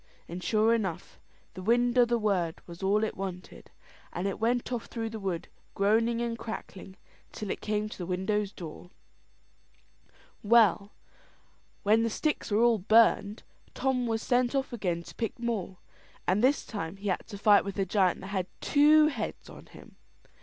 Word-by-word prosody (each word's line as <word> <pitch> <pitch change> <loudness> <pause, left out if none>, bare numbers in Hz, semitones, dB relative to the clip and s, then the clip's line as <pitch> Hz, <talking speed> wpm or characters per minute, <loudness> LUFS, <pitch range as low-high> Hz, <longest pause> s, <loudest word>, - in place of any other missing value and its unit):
And 180 +2 -7
sure 220 +1 +3
enough, 195 -8 -3 0.3
the 185 - -8
wind 240 +4 +2
o' 245 -1 +6
the 240 0 +1
word 190 -7 0
was 170 +1 -11
all 200 +3 +2
it 220 - -2
wanted. 185 -1 -7 0.5
It 190 +3 -2
went 240 +3 0
off 240 -2 -3
through 225 -2 -4
the 220 - -6
wood, 190 -4 -3 0.3
groaning 225 +4 +2
and 230 -1 -3
crackling, 200 -4 -8 0.4
till 210 -3 -5
it - - -5
came 210 0 -1
to 215 - -9
the 175 - -5
widow's 190 +2 -1
door. 175 -1 -10 1.5
Well, 210 -2 +4 0.9
when 215 +2 +4
the 230 - +1
sticks 300 +7 -2
were 215 +2 +3
all 235 -2 +4
burned, 215 +1 +3 0.3
Tom 255 -2 0
was 225 -1 -1
sent 250 +1 +1
off 270 -2 -1
again 180 -7 -2
to - - -12
pick 225 -2 -4
more; 225 -6 -3 0.5
and 195 +5 +1
this 275 +3 +3
time 195 -4 -5
he 200 +1 -4
had 185 - -2
to 205 - -8
fight 205 0 +5
with 200 0 -6
a 195 - +1
giant 190 -1 +1
that 190 - -8
had 185 -2 -1
two 300 +1 +5
heads 235 -7 -6
on - - -13
him. - - -16
210 Hz, 175 wpm, -29 LUFS, 190-235 Hz, 1.5 s, o